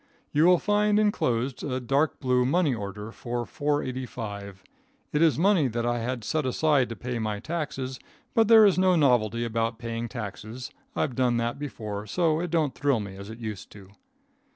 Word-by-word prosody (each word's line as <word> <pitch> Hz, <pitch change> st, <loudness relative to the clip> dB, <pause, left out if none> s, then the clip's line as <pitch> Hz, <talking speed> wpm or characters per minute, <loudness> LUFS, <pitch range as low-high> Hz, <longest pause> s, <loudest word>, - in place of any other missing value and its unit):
You 150 Hz, +3 st, +4 dB
will 180 Hz, 0 st, +6 dB
find 210 Hz, +2 st, +2 dB
inclosed 130 Hz, -, 0 dB
a 130 Hz, -3 st, -2 dB
dark 135 Hz, +5 st, 0 dB
blue 125 Hz, -2 st, +2 dB
money 145 Hz, +2 st, +2 dB
order 105 Hz, 0 st, -6 dB
for 120 Hz, +1 st, -4 dB
four 145 Hz, +3 st, -1 dB
eighty 130 Hz, 0 st, -4 dB
five. 100 Hz, -5 st, -7 dB, 0.5 s
It 150 Hz, -, +2 dB
is 165 Hz, -2 st, +4 dB
money 180 Hz, -4 st, +3 dB
that 120 Hz, 0 st, -2 dB
I 120 Hz, 0 st, 0 dB
had 120 Hz, 0 st, -3 dB
set 155 Hz, +8 st, -1 dB
aside 135 Hz, 0 st, +2 dB
to 115 Hz, -, -5 dB
pay 125 Hz, 0 st, -4 dB
my 105 Hz, -2 st, -2 dB
taxes, 140 Hz, -4 st, -4 dB, 0.3 s
but 225 Hz, -2 st, +4 dB
there 220 Hz, -1 st, +8 dB
is 190 Hz, -2 st, +4 dB
no 185 Hz, -1 st, +4 dB
novelty 120 Hz, -6 st, +2 dB
about 115 Hz, 0 st, -1 dB
paying 115 Hz, 0 st, -4 dB
taxes. 110 Hz, +2 st, -7 dB, 0.2 s
I've 140 Hz, -, 0 dB
done 125 Hz, -1 st, +1 dB
that 120 Hz, +3 st, -2 dB
before, 110 Hz, -7 st, -5 dB
so 160 Hz, -, +1 dB
it 175 Hz, +1 st, -2 dB
don't 155 Hz, -5 st, +1 dB
thrill 140 Hz, -5 st, +1 dB
me 100 Hz, -2 st, -6 dB
as 100 Hz, +1 st, -9 dB
it 110 Hz, -, -8 dB
used 110 Hz, -5 st, -6 dB
to. 100 Hz, -2 st, -14 dB
125 Hz, 190 wpm, -27 LUFS, 115-155 Hz, 0.5 s, there